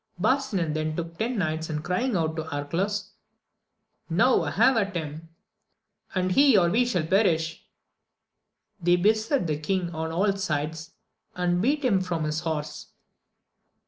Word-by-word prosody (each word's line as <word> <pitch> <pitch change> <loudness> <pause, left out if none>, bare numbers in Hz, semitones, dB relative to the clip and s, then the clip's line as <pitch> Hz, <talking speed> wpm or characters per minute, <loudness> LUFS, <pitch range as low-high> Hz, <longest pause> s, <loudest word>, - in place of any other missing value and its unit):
Barsinan 205 - +1
then 155 0 -2
took 165 0 -6
ten 235 +2 -1
knights, 160 -3 -2
and 150 -1 -3
crying 225 +8 -1
out 160 -2 0
to 160 -1 -4
Arcalaus, 185 +8 -2 1.0
Now - - +3
have 265 - +3
at 200 -3 0
him! 160 0 -6 0.9
and 185 0 0
he 275 +1 +5
or 175 -2 +3
we 245 +5 +3
shall 180 -10 0
perish! 165 -4 +1 1.2
they 175 +1 +4
beset 220 +5 +2
the 150 -2 -1
king 175 +2 -2
on 160 0 -3
all 195 +4 +2
sides, 160 -3 -3 0.4
and 180 0 0
beat 285 +5 +1
him 195 -7 +3
from 175 -3 -2
his 155 0 -1
horse. 155 -2 -4
175 Hz, 145 wpm, -26 LUFS, 160-205 Hz, 1.2 s, he